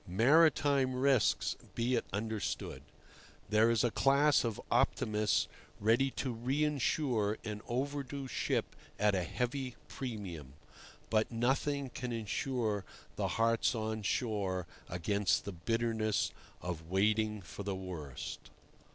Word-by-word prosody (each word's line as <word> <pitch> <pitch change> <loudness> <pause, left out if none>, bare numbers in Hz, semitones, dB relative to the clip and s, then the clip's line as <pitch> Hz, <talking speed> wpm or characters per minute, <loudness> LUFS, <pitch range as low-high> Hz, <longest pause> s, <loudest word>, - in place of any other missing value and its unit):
Maritime 140 - +4
risks, 130 -2 +3 0.2
be 120 +2 +1
it 120 - +1
understood. 110 +2 -3 0.7
There 110 +2 +5
is 115 -2 +3
a 120 - +2
class 140 +3 +4
of 115 -3 -2
optimists 105 0 +2 0.3
ready 115 +6 +3
to 130 -2 -1
reinsure 130 -3 +1
an 105 -1 -4
"overdue" 140 +2 -2
ship 125 - -1 0.2
at 105 0 +3
a 95 - +1
heavy 125 - -2
premium. 95 - -6 0.6
But 110 -1 +3
nothing 135 +3 0
can 125 0 -4
insure 115 -1 -1 0.3
the - - 0
hearts 115 +1 +3
on 110 0 -2
shore 100 -5 -1 0.2
against 95 +3 +1
the 100 - -3
bitterness 110 +3 0 0.3
of 85 -2 -5
waiting 105 +3 +2
for 90 +4 -8
the 100 -1 -2
worst. 85 -8 -6
115 Hz, 115 wpm, -33 LUFS, 105-130 Hz, 0.7 s, There